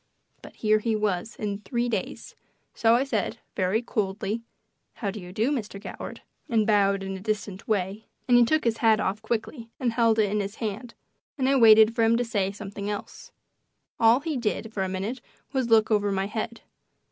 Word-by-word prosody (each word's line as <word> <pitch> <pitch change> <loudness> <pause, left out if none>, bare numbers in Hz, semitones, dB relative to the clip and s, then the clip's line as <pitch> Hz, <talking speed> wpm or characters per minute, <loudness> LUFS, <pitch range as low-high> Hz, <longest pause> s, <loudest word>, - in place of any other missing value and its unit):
But - - -13
here 215 -1 +2
he 225 0 0
was 210 0 -1
in 205 -1 -3
three 235 +4 -2
days, 235 - -4 0.4
so 225 0 +4
I 250 - +3
said, 230 -7 -2 0.2
very 190 +5 +1
coldly, 210 0 -2 0.5
"How 200 -3 -3
do 210 - -7
you 180 -1 -9
do, 220 +8 0
Mr. 215 -7 -3
Goward," 205 - -8 0.3
and 225 -3 +2
bowed 200 -2 +3
in 195 0 -4
a - - -6
distant 205 -1 -4
way; 205 0 -1 0.2
and 245 - +5
he 240 - +7
took 310 +6 +2
his 230 -1 +1
hat 220 -2 +4
off 200 +3 -1
quickly 225 +2 -4
and 245 -4 0
held 230 -1 +3
it 210 -3 +2
in 210 - 0
his 200 +1 -4
hand, 225 +2 -5 0.4
and 260 -2 +1
I 275 - +3
waited 220 -2 +7
for 230 - 0
him 225 +1 +4
to 245 - 0
say 200 -4 0
something 200 0 -6
else. 205 -1 -7 0.7
All 230 +3 +5
he 310 -2 -2
did 220 -1 -2
for 195 - -2
a 190 - -1
minute 200 +7 -4 0.3
was 260 -3 0
to 230 - +3
look 220 0 +4
over 205 -1 +2
my 195 0 0
head. 220 +2 -4
220 Hz, 205 wpm, -26 LUFS, 200-230 Hz, 0.7 s, he